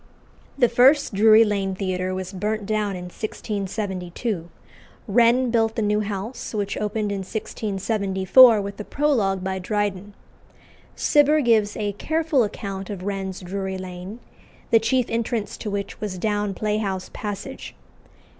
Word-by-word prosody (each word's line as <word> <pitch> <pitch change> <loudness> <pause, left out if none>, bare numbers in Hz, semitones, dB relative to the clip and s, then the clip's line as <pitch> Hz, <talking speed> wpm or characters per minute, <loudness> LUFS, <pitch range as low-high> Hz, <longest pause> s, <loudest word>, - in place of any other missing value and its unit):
The 250 -3 +5
first 260 +3 +4
Drury 215 +2 +7
Lane 200 -3 -1
Theatre 185 -1 -2
was 185 +1 -5
burnt 210 +2 -2
down 210 -2 -1
in 180 - -6
1672. 190 -1 -4 0.6
Wren 240 +3 +4
built 225 -1 +1
the 225 - 0
new 210 0 +2
house, 210 +3 -5
which 200 -1 -2
opened 210 0 -2
in 200 - -2
1674 205 +2 +3
with 200 +1 -7
a - - -3
prologue 215 -10 0
by 190 0 -2
Dryden. 205 0 -2 0.8
Cibber 295 0 +4
gives 220 -5 +2
a 205 -1 -1
careful 315 +3 +1
account 195 -2 -5
of 195 -3 -6
Wren's 195 -1 -4
Drury 190 +1 -4
Lane, 185 +4 -8 0.5
the 225 - +7
chief 240 +3 +1
entrance 230 -1 -2
to 215 - -5
which 200 0 -4
was 205 -3 -4
down 205 0 -1
Playhouse 210 -3 -2
Passage. 205 -1 -6
205 Hz, 135 wpm, -23 LUFS, 190-225 Hz, 0.8 s, Drury